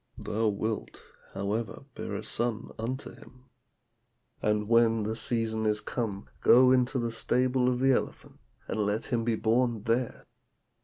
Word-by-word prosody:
Thou 110 +1 -1
wilt, 110 +1 -3 0.4
however, 105 +6 -3
bear 105 - -5
a 105 - -4
son 115 -2 -3
unto 130 +5 -4
him. 125 0 -16 1.0
And 105 0 +1
when 115 -1 +4
the 110 +2 -2
season 110 -1 0
is 105 0 +2
come, 105 -4 -4
go 125 +1 +7
into 130 +1 +2
the 120 -2 -1
stable 125 +2 +1
of 125 -1 0
the 135 +1 +4
elephant, 130 - -2 0.3
and - - -3
let 105 +3 -1
him 115 -1 +1
be 115 -1 +1
born 115 0 +1
there. 115 +2 -1
115 Hz, 150 wpm, -29 LUFS, 110-125 Hz, 1.0 s, go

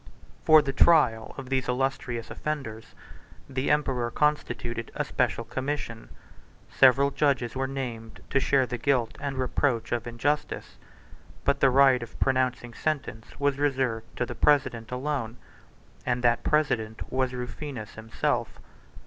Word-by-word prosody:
For 155 -1 +7
the 135 -2 -2
trial 130 -8 +4
of 130 - -7
these 130 -2 0
illustrious 125 -2 -2
offenders, 115 -8 -5 0.5
the 130 0 -2
emperor 130 -5 +1
constituted 120 -5 -1
a - - -1
special 115 - 0
commission: 130 -1 -4 0.6
several 135 +1 +5
judges 135 -5 +1
were 135 0 -1
named 120 -5 -6
to 135 - +3
share 135 -1 +3
the 125 0 -5
guilt 125 -5 +1
and 140 -2 -3
reproach 130 -2 0
of 120 0 -1
injustice; 140 +6 -2 0.7
but 140 0 +2
the 135 - +5
right 130 -1 +5
of 120 - -9
pronouncing 130 -2 0
sentence 140 -6 -4
was 140 -1 +1
reserved 130 -6 0
to 125 - -1
the 120 - -6
president 120 -3 +2
alone, 125 -3 -3 0.7
and 125 0 -1
that 120 -1 +3
president 115 -8 0
was 130 -1 0
Rufinus 125 -2 -6
himself. 110 0 -2
130 Hz, 135 wpm, -27 LUFS, 120-140 Hz, 0.7 s, For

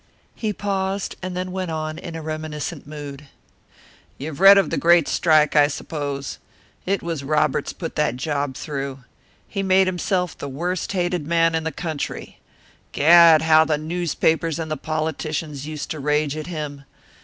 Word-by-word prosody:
He 215 -2 -2
paused, 195 -1 -2
and 185 0 -4
then 185 0 -3
went 185 -1 -3
on, 155 -1 -4
in 170 - -7
a 165 - -6
reminiscent 155 0 -5
mood, 145 -1 -8 0.9
"You've 145 +2 -6
read 195 +1 +9
of 195 -6 +2
the - - 0
great 170 -2 +4
strike, 155 -3 +3
I 145 -1 +6
suppose? 145 -2 -5 0.5
It 195 0 0
was 165 -4 -3
Roberts 150 0 +1
put 165 -4 -7
that 140 -5 +1
job 140 0 -2
through. 135 -3 -5 0.4
He 195 - -3
made 190 0 +4
himself 180 -1 -1
the 140 - -6
worst 175 +8 -3
hated 175 -4 -1
man 165 0 +3
in 160 -1 -1
the 160 - -1
country 160 -4 -5 0.5
Gad! 165 0 +7
how 160 0 +6
the 155 -1 0
newspapers 165 0 0
and 160 -2 -4
the - - 0
politicians 155 -2 -3
used 155 -2 -5
to 155 - -4
rage 150 +1 0
at 155 0 -6
him! 150 -5 -6
155 Hz, 165 wpm, -22 LUFS, 150-175 Hz, 0.9 s, read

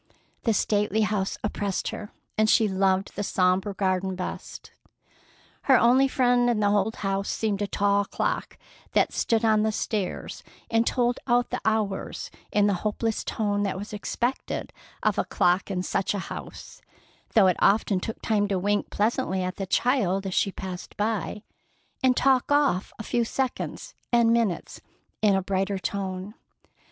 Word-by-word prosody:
The 225 - +3
stately 210 +1 +1
house 210 -2 0
oppressed 205 -2 -2
her, 210 - -7 0.2
and 215 0 +3
she 220 - +5
loved 190 0 +1
the - - -2
sombre 190 +1 +1
garden 190 -1 0
best. 180 - -7 0.9
Her 265 -2 +6
only 255 +3 +5
friend 245 -2 +3
in 235 -3 +1
the 205 - +3
old 205 +2 +1
house 195 0 -1
seemed 210 -2 -1
a 205 - 0
tall 200 0 +2
clock - - -2 0.4
that - - +2
stood 230 0 +1
on 215 -1 +4
the 220 0 +1
stairs 210 -2 -3 0.3
and 225 0 +2
told 245 -1 +1
out 245 0 +2
the 250 - -2
hours 215 -3 -1 0.2
in 205 -1 +3
the 205 - +3
hopeless 220 +1 -1
tone 205 -2 -1
that 195 -2 -1
was 205 +2 -7
expected 240 +5 -3 0.3
of - - +2
a - - +2
clock 180 +3 +1
in 180 -2 -2
such 195 +2 -1
a 195 - -5
house, - - -9 0.5
though 215 -4 +7
it 185 -2 +3
often 200 -1 +3
took 225 +4 -5
time 210 -2 +2
to 195 -1 0
wink 205 +3 0
pleasantly 210 -3 0
at 185 0 -4
the 195 - -4
child 200 -5 +1
as 190 - -3
she 195 - +2
passed 185 -1 -7
by, 210 0 -2 0.6
and 255 -2 +3
talk 265 0 +3
off 285 -11 +2
a 220 - -6
few 240 +2 0
seconds 260 +3 -3 0.2
and 235 -1 +4
minutes 225 -7 -1 0.4
in 210 -2 +4
a 190 - 0
brighter 195 +1 -1
tone. 190 0 -4
205 Hz, 165 wpm, -26 LUFS, 195-225 Hz, 0.9 s, though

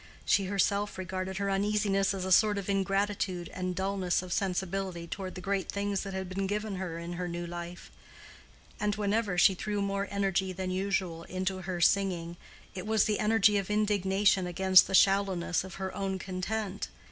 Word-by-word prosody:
She 195 - +3
herself 200 +1 0
regarded 185 +1 -4
her 200 0 -1
uneasiness 200 0 +1
as 185 -1 -3
a 190 - -3
sort 210 +2 +5
of 200 - -4
ingratitude 195 -2 -1
and 185 0 -3
dullness 190 -1 0
of 180 -1 -4
sensibility 190 -2 -2
toward 185 +2 -6
the 185 - -6
great 195 0 -1
things 200 -1 -1
that 195 - -5
had 190 -1 -4
been 190 +1 -2
given 210 0 -2
her 180 -3 -4
in 170 +1 -6
her 180 - -2
new 175 0 -4
life; 175 0 -7 0.9
and 210 -1 0
whenever 210 -2 0
she 190 - +6
threw 205 +2 -3
more 200 0 -1
energy 195 -2 0
than 185 0 -3
usual 185 -3 -1
into 185 +1 -2
her 180 0 -4
singing, 175 -2 +1 0.4
it 185 +2 -6
was 220 -1 +3
the 210 -1 0
energy 210 -1 +4
of 195 - -5
indignation 200 -2 +2
against 185 +1 +6
the 190 - 0
shallowness 195 -3 +3
of 190 -1 -9
her 190 -1 -4
own 195 -1 -2
content. 195 +2 -3
195 Hz, 180 wpm, -30 LUFS, 185-200 Hz, 0.9 s, she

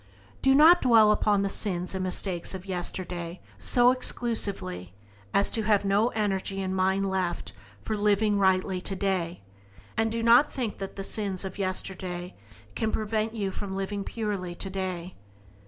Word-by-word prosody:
Do 270 0 +4
not 330 +5 +7
dwell 225 -4 +6
upon 205 -1 +2
the - - 0
sins 180 -3 -1
and 190 -1 -2
mistakes 185 -1 -1
of 185 0 -8
yesterday 175 -1 -4 0.2
so 245 0 +4
exclusively 200 - -1 0.4
as 200 - +2
to 225 - 0
have 210 -2 +2
no 200 +3 +3
energy 195 -2 -1
and 190 -1 -2
mind 190 +1 +1
left 185 -2 -2 0.3
for 215 - -2
living 205 0 +2
rightly 190 -1 +2
today, 185 - -1 0.5
and 225 0 +1
do 230 0 -2
not 240 +6 +6
think 240 -6 -4
that 195 -1 -6
the 195 - -5
sins 195 -2 +1
of 190 +1 -7
yesterday 185 -1 -3 0.4
can 220 - -1
prevent 220 +1 -2
you 200 -3 -2
from 190 0 -5
living 195 +1 -3
purely 200 -6 -4
today. 185 -2 -4
195 Hz, 155 wpm, -27 LUFS, 185-215 Hz, 0.5 s, not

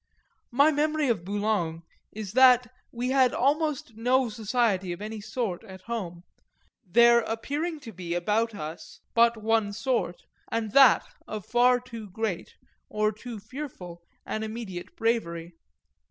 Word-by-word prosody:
My 285 +6 +5
memory 305 -1 +1
of 210 -8 0
Boulogne 195 -4 -1 0.3
is 210 -3 -6
that 250 -1 +7 0.3
we 245 +1 -3
had 260 -2 +3
almost 285 -3 0
no 250 +2 +2
society 215 -4 0
of 175 - -5
any 215 +1 -6
sort 210 -4 -3
at 190 -3 -11
home 185 -7 -5 0.6
there 235 +4 +6
appearing 290 +9 -3
to 235 -5 -9
be 175 -3 -5
about 210 +5 0
us 155 -2 -8
but 235 0 +4
one 220 -1 +1
sort, 225 -5 -1 0.3
and 225 -2 -1
that 270 -1 +6 0.2
of 215 -3 -6
far 245 +1 +4
too 230 -4 -9
great, 210 -2 -4 0.3
or 215 0 +1
too 225 +2 -8
fearful, 205 - -8 0.2
an 215 - -3
immediate 215 -5 -6
bravery. 175 -7 -1
225 Hz, 140 wpm, -27 LUFS, 200-245 Hz, 0.6 s, that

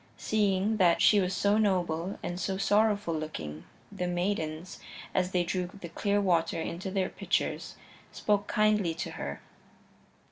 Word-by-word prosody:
Seeing 205 0 +1
that 175 -4 +4
she 210 - +6
was 185 -1 +1
so 205 +1 +3
noble 180 -3 0
and 175 +1 -3
so 190 0 -1
sorrowful 205 -2 +2
looking, 80 - -5 0.3
the 180 -3 -3
maidens, 175 -2 -2 0.3
as 185 -1 +1
they 180 -1 +1
drew 180 +1 -2
the 170 - -7
clear 200 +4 0
water 170 -4 +1
into 170 +4 -4
their 190 -1 0
pitchers, - - -2 0.4
spoke 205 -1 0
kindly 210 -5 +2
to 165 - -4
her. 70 0 -6
185 Hz, 145 wpm, -29 LUFS, 170-205 Hz, 0.4 s, she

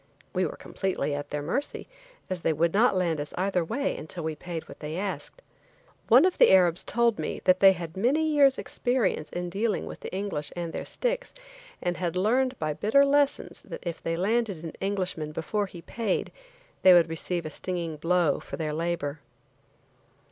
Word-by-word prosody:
We 185 -1 +1
were - - -7
completely 190 -6 -2
at 145 0 -4
their 145 0 -3
mercy, 280 - -3 0.4
as 185 -2 -4
they 165 - +2
would 165 +2 +1
not 215 +1 +4
land 165 -4 0
us 145 - -7
either 185 -1 +1
way 280 - -1
until 160 +2 -7
we 160 0 -2
paid 165 +1 -6
what - - -12
they 155 +2 -5
asked. 205 - -5 0.6
One 255 +8 +7
of 370 - 0
the - - +8
Arabs 180 -3 +4
told 235 -4 +1
me 155 - -3
that 185 0 +5
they 195 -1 +8
had 170 -2 -7
many 270 +11 +2
years' 280 -3 +5
experience 245 -11 -1
in 175 0 -4
dealing 210 +2 -1
with - - -8
the - - -7
English 185 -7 -3
and 170 -2 -4
their - - -4
sticks, - - -2 0.5
and 175 -1 -1
had 175 -1 -2
learned 250 +7 +2
by 155 -1 -1
bitter 220 - +4
lessons 285 0 +1
that - - -9
if 170 -1 -4
they 165 - -1
landed 200 -1 0
an 165 - -6
Englishman 185 -6 -2
before 200 +6 -1
he 175 -2 -11
paid 225 -5 -2 0.5
they 185 - +8
would 170 -2 +6
receive 165 +1 -3
a 155 - -5
stinging 170 -1 -4
blow 170 0 +2
for - - -8
their 155 -2 -2
labor. 160 -2 -2
180 Hz, 190 wpm, -27 LUFS, 165-220 Hz, 0.6 s, the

